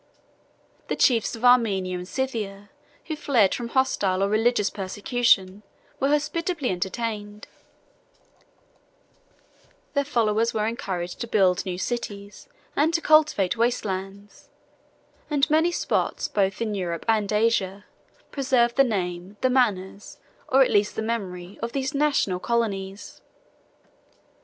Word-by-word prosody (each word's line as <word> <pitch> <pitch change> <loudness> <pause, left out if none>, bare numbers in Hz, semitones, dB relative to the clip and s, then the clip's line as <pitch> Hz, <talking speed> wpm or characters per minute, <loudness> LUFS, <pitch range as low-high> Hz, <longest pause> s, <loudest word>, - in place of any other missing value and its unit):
The - - -1
chiefs 235 -2 +2
of 230 +2 -4
Armenia 205 -7 +3
and 180 0 -6
Scythia, 210 -6 -4 0.3
who 315 - -4
fled 245 -10 +2
from 240 - -4
hostile 205 -7 +1
or 200 - +1
religious 215 -1 +2
persecution, 200 0 +1 0.4
were 270 - +2
hospitably 300 - -1
entertained: 205 +3 -4 2.5
their 280 -1 +2
followers 230 -4 +1
were 215 -1 +1
encouraged 185 -6 -4
to 235 - -3
build 190 -4 +2
new 180 -1 -3
cities 205 - -5 0.3
and 320 +3 +2
to - - +3
cultivate 305 - +3
waste 235 0 +1
lands; 195 +1 -6 0.8
and 290 -2 +2
many 320 +3 +3
spots, - - -1
both 195 0 0
in 215 -2 -2
Europe 175 -4 -3
and 215 -2 +1
Asia, 210 -2 +1 0.5
preserved 255 -4 +1
the 275 - +7
name, 185 -4 -3
the 255 - +2
manners, 205 -6 -1 0.3
or 265 +1 +6
at - - -1
least 205 0 +2
the - - -2
memory, 195 -5 -4
of 230 +1 -4
these 270 0 -2
national 280 -11 +1
colonies. 200 -4 -3
215 Hz, 125 wpm, -25 LUFS, 195-250 Hz, 2.5 s, the